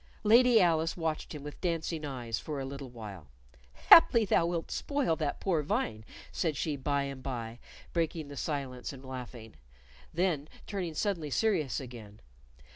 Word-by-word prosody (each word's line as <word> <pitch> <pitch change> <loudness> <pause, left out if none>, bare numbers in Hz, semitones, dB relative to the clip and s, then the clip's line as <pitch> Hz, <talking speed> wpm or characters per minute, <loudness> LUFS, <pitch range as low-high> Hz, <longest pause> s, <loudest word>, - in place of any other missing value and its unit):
Lady 235 +2 +6
Alice 165 -3 +2
watched 160 -2 -3
him 145 - -7
with 150 0 -9
dancing 165 -2 -2
eyes 120 -5 -3
for 150 -3 -5
a 135 - -3
little 135 0 -7
while. 105 -9 -9 0.6
"Haply 235 -9 +9
thou 170 -3 +3
wilt 170 -1 -3
spoil 280 - 0
that 150 -3 -2
poor 175 -5 +1
vine," 150 - -1 0.3
said 160 -4 -1
she 155 -3 -1
by 140 +1 0
and 140 -1 -6
by, 120 -3 -5 0.3
breaking 165 -2 -1
the 145 - -9
silence 135 -5 -3
and 135 -1 -11
laughing, 125 -3 -8 0.6
then 160 -4 0 0.2
turning 180 -6 -4
suddenly 170 -5 -1
serious 155 - +1
again. 115 -6 -10
150 Hz, 155 wpm, -31 LUFS, 130-170 Hz, 0.6 s, Haply